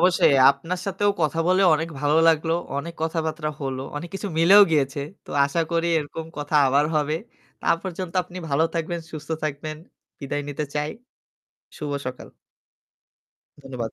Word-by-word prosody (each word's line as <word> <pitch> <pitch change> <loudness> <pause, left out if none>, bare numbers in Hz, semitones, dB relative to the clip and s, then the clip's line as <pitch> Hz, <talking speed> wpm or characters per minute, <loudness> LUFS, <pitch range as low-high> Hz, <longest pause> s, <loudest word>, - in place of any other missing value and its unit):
অবশ্যই। 175 -5 +4 0.2
আপনার 165 +6 -4
সাথেও 200 +1 +1
কথা 155 +1 0
বলে 185 +1 +4
অনেক 160 +2 -2
ভালো 150 +1 +2
লাগলো। 160 0 +2 0.3
অনেক 170 +3 -6
কথাবার্তা 160 -1 -2
হলো। 135 -1 -3
অনেক 170 +4 -5
কিছু 200 +1 -4
মিলেও 195 +5 +8
গিয়েছে। 140 -2 +1 0.2
তো - - -13 0.2
আশা 155 +4 -1
করি 170 0 +1
এরকম 155 +2 -5
কথা 145 +1 -4
আবার 140 +3 +3
হবে। 150 +1 +1 0.4
তা - - -8 0.2
পর্যন্ত 185 -2 -5
আপনি 180 +1 -10
ভালো 140 +3 +3
থাকবেন, 170 +1 -2
সুস্থ 150 0 -8 0.2
থাকবেন। 155 +1 -4 0.4
বিদায় 145 +1 -3
নিতে 145 +1 -3
চাই। 150 +1 -1 0.9
শুভ 150 -1 -4 0.2
সকাল। 130 - -7 1.3
ধন্যবাদ। 125 -5 -5
155 Hz, 150 wpm, -24 LUFS, 145-170 Hz, 1.3 s, মিলেও